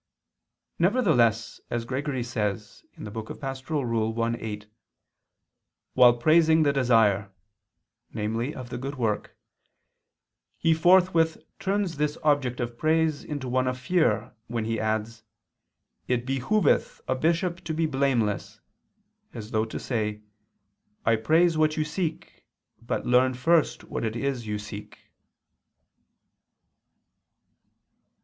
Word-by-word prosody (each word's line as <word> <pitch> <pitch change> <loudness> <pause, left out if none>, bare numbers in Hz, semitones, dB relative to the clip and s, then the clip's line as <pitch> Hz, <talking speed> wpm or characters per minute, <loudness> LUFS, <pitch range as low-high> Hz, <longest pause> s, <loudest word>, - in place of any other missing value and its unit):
Nevertheless, 160 - +2
as 120 -1 -2
Gregory 130 0 -2
says 105 -3 -4
(Pastor. 110 +6 -7 0.7
i, 115 0 +1
8), 105 -1 -6 1.3
"while 120 -1 +6
praising 160 +4 +4
the 140 -2 +2
desire" 110 -7 +3 0.8
(namely 115 +5 -2
of 125 -1 -8
the 120 - -4
good 135 +3 -5
work) 115 -5 -2 1.2
"he 165 -1 +3
forthwith 170 -1 +4 0.2
turns 195 -4 -1
this 150 0 -1
object 145 -5 +1
of 120 -1 -4
praise 160 -1 +1
into 145 -4 -5
one 130 +1 +1
of 130 0 -1
fear, 125 - +1
when 115 -1 -3
he 115 0 -1
adds: 110 +1 -2 0.9
It 125 -1 0
behooveth... 135 +11 +1
a 130 - +2
bishop 170 +5 0
to 160 - -3
be 165 +1 +1
blameless," 130 - 0 0.8
as 110 -1 -7
though 110 0 +1
to 110 - -6
say: 105 -3 -3 0.8
"I 115 - +4
praise 160 +8 +3
what 155 0 +2
you 155 - +2
seek, 165 +1 -5 0.3
but 115 - -3
learn 125 +1 +3
first 160 +5 +2
what - - -5
it 110 0 -2
is 125 -2 -2
you 105 0 -2
seek." 105 0 -9
125 Hz, 115 wpm, -26 LUFS, 115-155 Hz, 1.3 s, while